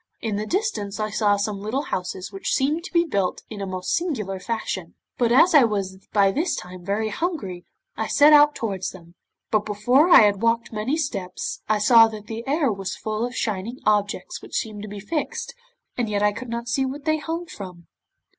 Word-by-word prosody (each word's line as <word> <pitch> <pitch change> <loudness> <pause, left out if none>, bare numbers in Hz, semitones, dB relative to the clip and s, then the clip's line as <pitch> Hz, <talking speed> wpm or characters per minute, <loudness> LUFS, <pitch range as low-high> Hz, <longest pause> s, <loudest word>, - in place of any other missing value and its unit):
In 220 -3 -2
the 210 +1 -3
distance 345 - -2
I 215 0 -2
saw 205 -1 +2
some 200 0 -2
little 235 +7 -2
houses 185 -2 -4
which 195 -1 -2
seemed 300 +5 0
to - - -8
be 340 -1 +3
built 200 - -1
in 210 -2 -6
a 195 - -3
most 185 -1 -3
singular 220 - -2
fashion, 190 -4 -4 0.2
but 235 -2 +2
as 325 +8 +6
I 290 -4 +8
was 195 -4 -1
by 200 -2 +4
this 320 - 0
time 180 0 -8
very 205 +4 -1
hungry 210 - -3 0.3
I - - -1
set 295 +1 +6
out 295 0 +7
towards 195 -5 -3
them, 170 -2 -14 0.4
but 215 -1 +2
before 245 - +3
I - - +9
had 205 -2 +2
walked 230 0 +1
many 220 +8 -1
steps, 195 - -4
I 215 - +3
saw 225 +2 +7
that 215 -2 -8
the 225 +1 -6
air 285 -2 +2
was 195 -1 -4
full 215 +1 -3
of 245 +1 -3
shining 215 +3 -2
objects 210 +10 0
which - - -9
seemed 215 -2 -4
to 210 - -7
be 205 0 -7
fixed, 300 +10 -3 0.4
and 240 -3 -1
yet 205 -1 0
I 210 - +4
could 250 +4 -8
not 235 +1 -4
see 265 +3 +1
what 275 +2 -5
they 310 0 +2
hung 325 +4 -4
from. 180 - -10
215 Hz, 210 wpm, -23 LUFS, 200-270 Hz, 0.4 s, I